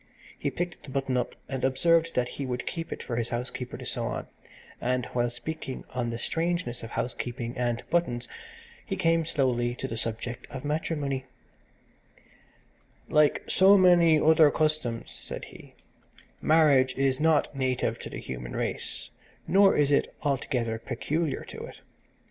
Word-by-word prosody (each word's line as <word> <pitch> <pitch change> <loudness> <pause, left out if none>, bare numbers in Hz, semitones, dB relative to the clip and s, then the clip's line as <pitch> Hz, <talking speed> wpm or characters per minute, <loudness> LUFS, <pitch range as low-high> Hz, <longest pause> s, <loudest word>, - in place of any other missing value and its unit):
He - - -2
picked 175 0 -4
the - - -12
button 135 -1 -1
up 125 -1 -1
and 130 -1 -4
observed 165 +5 +3
that 125 -1 +2
he 140 - -5
would 125 -1 -3
keep 165 -1 -4
it - - -5
for 115 - -3
his 120 -1 0
housekeeper 125 +1 -4
to - - -9
sew - - -2
on, - - -3 0.6
and, 125 0 0
while 120 -1 +1
speaking 135 +2 -5
on 125 -2 -1
the 115 - -3
strangeness 165 -2 -1
of 115 - -7
housekeeping 120 0 -3
and 120 -1 -1
buttons, 125 -9 +1 0.6
he 195 - -3
came 165 -3 +2
slowly 125 -6 +1
to 130 - -4
the 115 - -5
subject 115 +2 -4
of 130 +1 -7
matrimony 145 -3 -1 1.8
"Like 150 -1 +4
so 195 +2 +6
many 175 -4 +6
other 155 0 +6
customs," 150 -6 -1
said - - -7
he, - - -14 0.7
"marriage 145 -5 +4
is 135 -1 +1
not 155 -2 +2
native 130 -2 0
to - - -7
the - - -7
human - - -6
race, - - -3 0.4
nor 195 +1 +5
is 145 -1 +3
it 140 - +2
altogether 125 -5 -1
peculiar 155 +4 -2
to - - -9
it. - - -12
135 Hz, 155 wpm, -28 LUFS, 120-160 Hz, 1.8 s, so